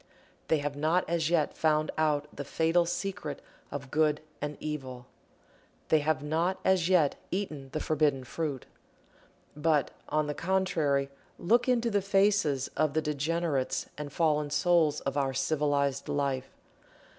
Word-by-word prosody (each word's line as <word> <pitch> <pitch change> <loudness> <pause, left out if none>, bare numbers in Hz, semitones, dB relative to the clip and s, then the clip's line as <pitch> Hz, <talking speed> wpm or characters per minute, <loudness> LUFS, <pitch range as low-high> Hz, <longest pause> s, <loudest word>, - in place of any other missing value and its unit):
They 160 - +3
have 145 -1 -3
not 160 +5 +1
as 165 -2 0
yet 165 -3 +2
found 155 -1 +2
out 150 -2 +1
the 140 - -4
fatal 165 +4 +2
secret 175 -5 -3 0.3
of 135 -2 -7
Good 155 0 +2 0.2
and 150 0 -4
Evil 130 -5 -5 0.8
they 155 - +5
have 145 -2 0
not 165 +5 0
as 185 -2 +3
yet 165 -7 +3
eaten 155 -8 -4
the 155 - -2
forbidden 150 -4 +1
fruit. 140 0 -4 0.9
But, 150 -1 +1 0.2
on 155 0 +1
the 150 - -2
contrary, 160 -6 0 0.3
look 235 +8 +2
into 235 -2 +2
the 205 -1 +2
faces 195 -8 +2
of 155 -1 +1
the 160 - +3
degenerates 150 -1 -1
and 145 -1 -6
fallen 150 -1 +1
souls 160 -1 +2
of 135 +1 -3
our 135 -2 0
civilized 140 -1 0
life. 135 -2 -1
150 Hz, 145 wpm, -29 LUFS, 145-170 Hz, 0.9 s, they